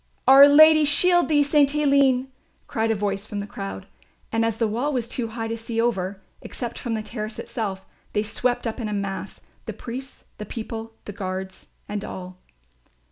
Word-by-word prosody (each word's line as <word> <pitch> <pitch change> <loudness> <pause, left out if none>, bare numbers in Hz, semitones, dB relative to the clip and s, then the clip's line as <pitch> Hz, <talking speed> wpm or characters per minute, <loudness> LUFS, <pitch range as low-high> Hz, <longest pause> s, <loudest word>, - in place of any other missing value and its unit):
"Our 270 +2 +10
Lady 310 +2 +7
shield 350 +5 +4
thee, 295 -2 +4
St. 285 -1 +3
Aline," 275 -3 +3 0.4
cried 225 -1 -1
a 225 - +2
voice 200 0 -2
from 205 - -6
the 200 - -4
crowd; 95 - -7 0.5
and 225 0 +1
as 225 -1 0
the 225 - +1
wall 240 +8 -1
was 245 -4 -1
too 235 -1 -3
high 225 0 -5
to 225 - -3
see 230 0 -4
over, 200 -5 -1 0.2
except 240 -2 -6
from 235 -2 -3
the 215 - -3
terrace 215 -1 -6
itself, 195 -5 -4 0.3
they 210 - +1
swept 245 +3 -1
up 225 +2 -3
in 220 -3 -3
a - - -3
mass, 200 -1 -4 0.3
the - - -4
priests, 260 +3 -8 0.2
the 210 - -5
people, 225 0 -6
the 205 - -7
guards 190 -1 -6 0.2
and 205 -1 -4
all. 185 -2 -8
225 Hz, 190 wpm, -24 LUFS, 205-265 Hz, 0.5 s, Our